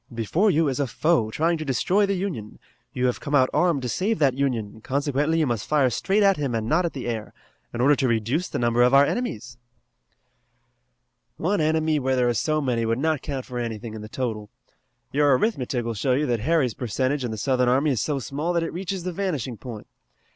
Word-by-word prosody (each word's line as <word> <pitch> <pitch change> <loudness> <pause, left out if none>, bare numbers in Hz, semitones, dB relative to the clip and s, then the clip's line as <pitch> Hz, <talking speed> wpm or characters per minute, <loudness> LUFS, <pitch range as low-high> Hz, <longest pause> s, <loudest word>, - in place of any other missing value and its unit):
Before 120 - +1
you 160 -3 +2
is 135 0 -2
a 140 - +1
foe 155 -4 +1
trying 165 +7 0
to - - -3
destroy 180 - +1
the 200 - 0
Union. 170 - -4 0.3
You 125 - -1
have 125 - 0
come 145 - -2
out 130 -2 +4
armed 170 -7 +2
to - - -2
save 200 - 0
that 140 -4 +3
Union, 120 -6 -2
consequently 145 +5 0
you 160 - +2
must 120 -5 -2
fire 140 -4 +3
straight 200 - +1
at 195 -1 +4
him 140 -5 -2
and 110 -1 -2
not 170 +7 +2
at 170 - -2
the 130 - -6
air, 115 -3 -4 0.4
in 120 - -3
order 145 +3 +5
to 130 - +1
reduce 120 - 0
the - - -3
number 120 0 +2
of 125 +2 +5
our 140 +1 +7
enemies." 120 - -4 1.8
"One 185 +2 0
enemy 155 0 +1
where 130 -1 0
there 125 -1 +2
are - - +1
so 155 +6 0
many 125 -4 0
would 115 0 0
not 155 +1 0
count 135 -3 -5
for 125 -1 -5
anything 115 -1 -5
in 110 - -7
the 110 - -9
total. 110 -4 -4 0.6
Your 145 -2 +4
arithmetic 125 - -1
will 115 - -2
show 125 +5 0
you 145 +4 +1
that 120 -4 0
Harry's 140 -1 +1
percentage 130 +5 -1
in 120 - -2
the 110 - -5
Southern 125 +2 +1
army 140 +4 +2
is 120 -7 0
so 150 -2 -1
small 145 +6 -3
that 170 -1 +1
it 165 - -4
reaches 185 +1 -4
the 180 0 -3
vanishing 155 - -2
point. 110 -1 -9
135 Hz, 225 wpm, -24 LUFS, 120-160 Hz, 1.8 s, our